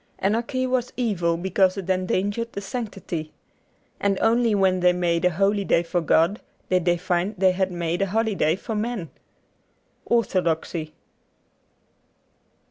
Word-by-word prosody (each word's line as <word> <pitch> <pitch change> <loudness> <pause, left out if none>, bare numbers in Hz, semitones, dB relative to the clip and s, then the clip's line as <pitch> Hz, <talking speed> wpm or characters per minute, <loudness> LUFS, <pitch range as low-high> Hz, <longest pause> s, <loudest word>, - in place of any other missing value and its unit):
Anarchy 235 +6 0
was 250 -1 -1
evil 180 -9 0
because 190 +2 +1
it 190 -2 -5
endangered 195 +5 -1
the - - -4
sanctity. 195 -7 -5 0.7
And 200 -1 +1
only 230 -1 +3
when 190 -2 +2
they 180 0 +4
made 170 -1 0
a - - +5
holy 200 +4 +1
day 170 -3 +2
for 175 +1 -1
God 165 +5 +2 0.3
did 180 -2 +2
they 175 -1 +3
find 180 +3 -1
they 185 0 +4
had 190 0 -1
made 175 0 -2
a 195 - +2
holiday 205 -6 +1
for 220 +4 -6
men. 215 -5 -3 0.5
' - - -43
Orthodoxy. 170 -7 0
190 Hz, 140 wpm, -24 LUFS, 175-215 Hz, 0.7 s, a